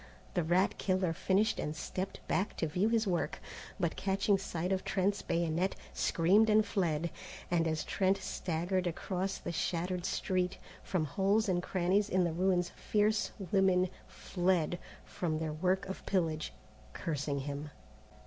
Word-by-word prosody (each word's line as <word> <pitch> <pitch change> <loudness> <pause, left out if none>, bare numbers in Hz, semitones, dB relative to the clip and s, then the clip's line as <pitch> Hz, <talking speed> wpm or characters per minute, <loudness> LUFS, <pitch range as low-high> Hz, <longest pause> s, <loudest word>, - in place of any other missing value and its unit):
The 180 - +2
rat 180 +4 +2
killer 185 -3 +1
finished 195 +5 +2
and 150 - -2
stepped 185 +5 -5
back 195 - 0
to - - 0
view 180 +8 +1
his 225 -1 +2
work, 180 -3 -1 0.4
but 170 -3 0
catching 195 +1 +2
sight 175 -1 -3
of 190 0 0
Trent's 195 +1 +1
bayonet, 170 +2 0 0.2
screamed 195 +7 +4
and 215 0 +5
fled, 170 -5 0 0.4
and 165 -2 +3
as 155 -1 -1
Trent 195 0 +1
staggered 180 0 -1
across 185 +3 -2
the - - -5
shattered 175 +1 -1
street, 185 -1 0 0.2
from 175 -5 -1
holes 200 +8 +2
and 180 -2 +1
crannies 190 +3 +1
in 185 0 +3
the 170 -2 0
ruins 180 0 +2
fierce 215 0 +1 0.2
women 185 -2 +3 0.2
fled 175 -2 0 0.3
from 160 -3 -2
their 155 -1 -2
work 185 +5 +1
of 190 0 -6
pillage, 160 -5 0 0.4
cursing 145 -3 -2
him. 145 +2 -5
180 Hz, 150 wpm, -33 LUFS, 165-195 Hz, 0.4 s, and